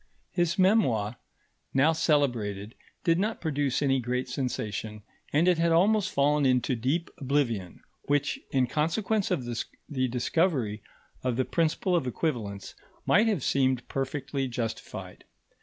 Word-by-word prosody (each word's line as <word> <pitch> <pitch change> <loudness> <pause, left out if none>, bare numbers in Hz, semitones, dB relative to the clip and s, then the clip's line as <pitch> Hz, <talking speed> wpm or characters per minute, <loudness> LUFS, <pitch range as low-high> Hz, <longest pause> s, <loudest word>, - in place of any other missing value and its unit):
His 175 -1 0
memoir, 130 - +3 0.6
now 150 +4 +5
celebrated, 120 - 0 0.3
did 165 -1 +3
not 215 +3 -1
produce 145 -4 0
any 135 -1 +3
great 125 +1 -2
sensation, 110 -4 -4 0.3
and 155 +5 +3
it 180 -2 +4
had 170 0 +3
almost 200 +5 +3
fallen 145 +1 +2
into 130 -1 +2
deep 140 +9 -1
oblivion, 125 - -1 0.3
which, 145 +1 +1
in 130 -2 +2
consequence 185 - 0
of 125 - -1 0.4
the 130 -3 0
discovery 125 - 0 0.4
of 125 -2 0
the 130 +1 +1
principle 170 +2 +1
of 165 -7 0
equivalence, 115 - -3 0.3
might 215 +4 +4
have 200 - 0
seemed 130 -2 +1
perfectly 135 0 -2
justified. 120 -2 -5
140 Hz, 130 wpm, -28 LUFS, 125-165 Hz, 0.6 s, now